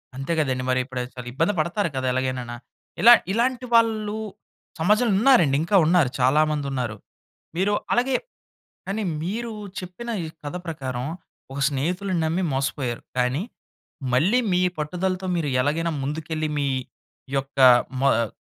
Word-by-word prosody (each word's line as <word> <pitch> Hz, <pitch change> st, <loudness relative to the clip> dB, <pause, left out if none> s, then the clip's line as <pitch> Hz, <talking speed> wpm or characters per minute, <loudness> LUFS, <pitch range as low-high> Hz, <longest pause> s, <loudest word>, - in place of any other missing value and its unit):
అంతే 135 Hz, +5 st, -4 dB
కదండీ! 130 Hz, -4 st, 0 dB
మరి 130 Hz, 0 st, +2 dB
ఇప్పుడు 130 Hz, -1 st, -4 dB
చాలా 125 Hz, -1 st, -7 dB
ఇబ్బంది 165 Hz, +8 st, +1 dB
పడతారు 170 Hz, +4 st, 0 dB
కదా! 130 Hz, 0 st, -2 dB
ఎలాగైననా. 130 Hz, -2 st, -2 dB, 0.5 s
ఇలా 240 Hz, +2 st, +10 dB, 0.2 s
ఇలాంటి 245 Hz, +4 st, 0 dB
వాళ్ళు 220 Hz, -2 st, +3 dB, 0.6 s
సమాజంలో 210 Hz, +6 st, +3 dB
ఉన్నారండి, 215 Hz, -, +5 dB
ఇంకా 185 Hz, +5 st, 0 dB
ఉన్నారు 165 Hz, -6 st, +4 dB
చాలా 130 Hz, +4 st, +4 dB
మంది 150 Hz, -2 st, -2 dB
ఉన్నారు. 125 Hz, -4 st, -2 dB, 0.6 s
మీరు 195 Hz, +4 st, +1 dB, 0.2 s
అలాగే, 250 Hz, +2 st, +2 dB, 0.7 s
కానీ 205 Hz, +3 st, -2 dB, 0.2 s
మీరు 225 Hz, +6 st, -3 dB, 0.3 s
చెప్పిన 185 Hz, +6 st, -7 dB
ఈ -, -, -4 dB, 0.2 s
కథ 145 Hz, +4 st, -4 dB
ప్రకారం, 130 Hz, -6 st, -4 dB, 0.5 s
ఒక 140 Hz, -, -4 dB
స్నేహితుడిని 175 Hz, +6 st, -1 dB
నమ్మి 170 Hz, +4 st, 0 dB
మోసపోయారు. 135 Hz, -2 st, -2 dB, 0.2 s
కానీ, 125 Hz, +6 st, +1 dB, 0.7 s
మళ్ళీ 180 Hz, -, +3 dB
మీ 180 Hz, -, +3 dB, 0.2 s
పట్టుదలతో 185 Hz, +5 st, -2 dB
మీరు 155 Hz, -4 st, -1 dB
ఎలాగైనా 165 Hz, +5 st, 0 dB
ముందుకెళ్ళి 155 Hz, +2 st, -3 dB
మీ 140 Hz, -, 0 dB, 0.7 s
యొక్క 135 Hz, 0 st, -4 dB, 0.4 s
మ -, -, -2 dB, 0.2 s
ఆహ్ 110 Hz, -, -4 dB
160 Hz, 135 wpm, -24 LUFS, 135-200 Hz, 0.7 s, ఇలా